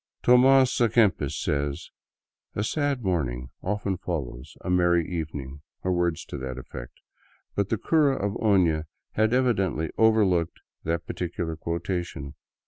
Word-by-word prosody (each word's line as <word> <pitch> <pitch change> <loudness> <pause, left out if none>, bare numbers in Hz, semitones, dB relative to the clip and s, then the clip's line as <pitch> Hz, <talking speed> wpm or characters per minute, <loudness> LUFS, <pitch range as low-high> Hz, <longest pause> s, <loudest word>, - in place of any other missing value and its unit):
Tomas 130 +1 +5
a 120 - +5
Kempis 100 - +2
says: 70 -1 -2 0.3
" - - -50
A 105 - 0
sad 140 +1 -1
morning 65 -10 -1
often 100 -1 -1
follows 70 -9 -5
a - - -5
merry 85 -2 +3
evening," 75 -5 -5 0.2
or 95 - +1
words 85 -2 0
to 70 - -6
that 65 -1 -5
effect, 60 -1 -8 0.6
but 100 -1 0
the 115 - +1
cura 145 +2 +3
of 100 -3 -2
Ona 85 -7 +3 0.2
had 110 +1 +2
evidently 100 -10 +1
overlooked 100 -7 +3 0.3
that 85 +1 -1
particular 85 -2 -3
quotation. 85 -3 -4
90 Hz, 135 wpm, -26 LUFS, 75-110 Hz, 0.6 s, Tomas